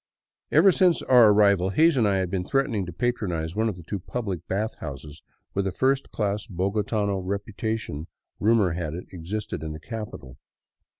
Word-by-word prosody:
Ever 195 - +6
since 180 -1 +3
our 120 -4 +7
arrival 100 -3 +4
Hays 160 - +4
and 115 -5 +3
I 100 - +2
had 95 -2 -1
been 95 -2 -1
threatening 115 -5 0
to - - -5
patronize 90 -5 -2
one 110 +1 +1
of 105 - -4
the 85 - -11
two 100 +4 -4
public 95 -3 -4
bath 105 +4 -1
houses 75 +1 -8 0.3
with 100 0 0
a - - -1
first 135 +7 +1
class 105 -1 -2
bogotano 100 +2 -1
repu 100 +2 -4
tation 110 -9 -3 0.3
rumor 105 -4 +3
had 80 -2 -3
it 90 - -7
existed 95 +1 -5
in 80 -1 -5
the 75 - -8
capital. 105 - -8
100 Hz, 180 wpm, -25 LUFS, 90-110 Hz, 0.3 s, our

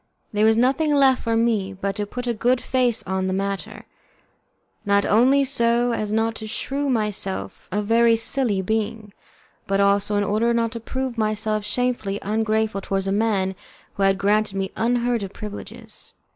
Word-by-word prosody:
There 210 +1 +3
was 220 0 +4
nothing 275 +5 +2
left 270 -2 +4
for 230 0 0
me 220 -4 0
but 195 +1 -3
to 205 -1 -2
put 245 +4 -5
a 240 - 0
good 245 +3 +1
face 250 -3 0
on 190 0 -2
the 185 - -1
matter, 195 0 -4 1.0
not 200 -1 +2
only 260 +6 +4
so 240 -2 +2
as 210 -2 -2
not 225 +1 +1
to 220 - -7
shew 275 +6 -3
myself 210 -5 -2
a 210 +2 -1
very 230 +2 +4
silly 225 -4 +1
being, 220 0 -3 0.5
but 195 0 +1
also 200 +1 +2
in 205 - +2
order 220 +4 +1
not 230 -1 0
to 230 - -6
prove 260 +1 -4
myself 215 0 0
shamefully 215 -3 -1
ungrateful 220 -1 0
towards 195 0 -2
a 195 - -1
man 200 -2 +1 0.4
who - - -6
had 195 0 +3
granted 205 0 +1
me 195 -1 -2
unheard 240 0 0
of 195 -1 -6
privileges. 210 -1 -9
220 Hz, 170 wpm, -22 LUFS, 200-235 Hz, 1.0 s, was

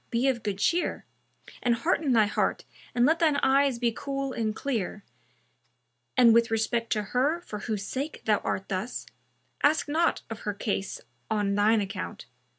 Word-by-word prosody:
be 240 +3 +1
of 255 -3 +1
good 205 -2 -2
cheer, 345 - 0 0.6
and 240 -2 +2
hearten 305 +3 +1
thy 225 -3 +5
heart 205 - -1 0.3
and 240 0 +4
let 320 +4 +3
shine 310 -3 +4
eyes 275 -1 +3
be 235 -1 +1
cool 275 +3 -4
and 220 -2 -1
clear 220 -7 -3 1.1
and, 235 -3 +7
with 230 0 +4
respect 225 +1 0
to 210 -2 +1
her 285 +7 +2
for 210 -11 -7
whose 205 -1 -3
sake 280 +7 -4
thou 210 -2 +3
art 190 - -3
thus, 195 +5 -3 0.6
ask 305 +2 +3
not 325 +3 +1
of 225 -1 -7
her 210 -1 -3
case 200 -2 -3 0.3
on 205 -2 +1
shine 210 +2 +4
account. 200 +1 -5
235 Hz, 165 wpm, -27 LUFS, 210-275 Hz, 1.1 s, and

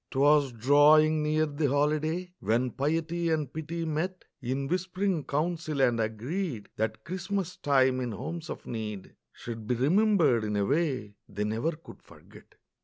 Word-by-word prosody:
'Twas 145 0 +3
drawing 150 +6 +5
near 155 +1 +2
the 145 -1 -1
holiday, 155 +5 0
When 120 +3 0
piety 165 +6 -1
and 155 -5 -1
pity 165 +2 -4
met 165 +4 -3 0.2
In 135 +2 -2
whisp'ring 185 0 -1
council, 155 0 -1
and 120 -3 +3
agreed 115 - -3
That 110 0 -2
Christmas 185 0 -3
time, 130 -2 +3
in 125 -2 -2
homes 160 +9 -6
of - - -7
need, 105 -4 -6 0.2
Should 115 -2 -8
be 125 - +1
remembered 155 - +3
in 105 -1 -2
a 100 -1 +1
way 135 -8 -1
They 105 0 -3
never 110 +10 -1
could 160 +2 -14
forget. - - -17
145 Hz, 150 wpm, -28 LUFS, 120-165 Hz, 0.2 s, drawing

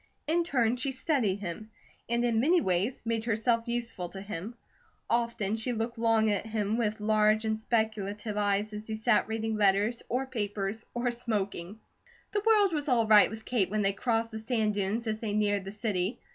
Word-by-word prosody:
In 335 +3 +2
turn 245 -7 +1
she 265 +2 -1
studied 250 - 0
him, 205 +3 -6 0.4
and 235 +1 +1
in 230 -2 +2
many 330 +9 +4
ways 195 - 0
made 225 -1 -1
herself 230 +1 +1
useful 230 -7 -2
to 195 - -8
him. 200 +3 -6 0.5
Often 230 -3 0
she 245 +2 -2
looked 225 +1 -3
at 220 -2 +2
him 215 -1 -1
with 220 -2 -1
large 215 +1 +3
and 220 0 +1
speculative 215 -2 -2
eyes 205 +1 0
as 210 +1 -7
he 220 - -3
sat 220 +1 +2
reading 220 0 -2
letters, 205 +3 +2
or 255 +3 0
papers, 205 -3 -3
or 240 0 0
smoking. 210 -5 -3 0.5
The 410 - 0
world 420 -4 +4
was 295 -1 0
all 235 -3 +3
right 215 -1 +7
with 220 0 -9
Kate 225 -7 +1
when 210 +1 0
they 195 0 +2
crossed 230 +2 0
the 220 - -5
sand 220 -2 0
dunes 205 +3 -1
as 215 -1 -2
they 220 -3 -3
neared 205 -2 +1
the 195 - -5
city. 210 -1 -2
220 Hz, 185 wpm, -29 LUFS, 205-235 Hz, 0.5 s, right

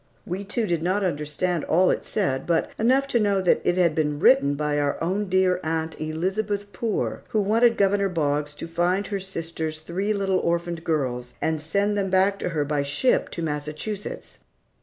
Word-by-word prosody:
We 185 +3 -4
two 210 +3 -1
did 170 -5 -1
not 185 +4 0
understand 160 +1 -1
all 180 +3 +4
it - - -2
said, 135 -11 -1
but 170 -1 +1
enough 260 +5 +3
to 240 - +2
know 200 -2 +2
that 185 -2 +3
it 175 - +1
had 170 -3 +3
been 150 -2 0
written 150 - +5
by 150 0 0
our 145 -1 0
own 190 +4 -1
dear 185 -1 +3
aunt, 160 0 -2
Elizabeth 200 +6 -2
Poor, 225 -3 -2
who 215 - +1
wanted 230 +3 +3
Governor 200 0 +2
Boggs 145 -3 -1
to 165 - -7
find 175 +4 0
her 200 0 -3
sister's 165 -4 -4
three 180 +6 -2
little 195 -2 +1
orphaned 170 -1 -1
girls 125 -7 -2
and 160 -1 -1
send 200 +6 0
them 195 -1 0
back 190 +2 +3
to - - -2
her 155 -4 -1
by 145 0 0
ship 145 - +1
to 170 - -5
Massachusetts. 155 +7 -5
175 Hz, 185 wpm, -24 LUFS, 155-200 Hz, -, written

